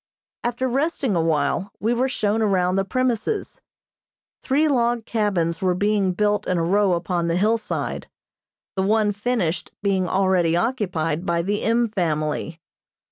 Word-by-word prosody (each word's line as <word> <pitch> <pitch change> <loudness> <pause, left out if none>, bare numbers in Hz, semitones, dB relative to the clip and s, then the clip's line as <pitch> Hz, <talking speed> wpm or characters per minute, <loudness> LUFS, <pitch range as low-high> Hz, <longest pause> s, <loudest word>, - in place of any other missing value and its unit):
After 245 +2 -1
resting 270 - 0
a 170 - +2
while 165 +5 0
we 225 +3 +1
were 255 +2 +1
shown 215 -3 0
around 185 -4 +2
the 195 - +2
premises. 255 - -1 0.8
Three 290 +4 +2
log 240 -4 +1
cabins 190 -6 0
were 185 -1 +2
being 200 -1 +1
built 210 +1 0
in 180 - +1
a 165 - +1
row 195 +2 +3
upon 170 0 -1
the 170 +1 +1
hillside, 220 +4 -1 0.7
the 190 - 0
one 210 +1 +2
finished 205 -5 -1
being 190 -3 +1
already 185 -3 +2
occupied 175 - -1
by 170 -2 0
the 205 +3 -1
M. 235 +1 +2
family. 160 -4 -2
200 Hz, 145 wpm, -23 LUFS, 175-230 Hz, 0.8 s, row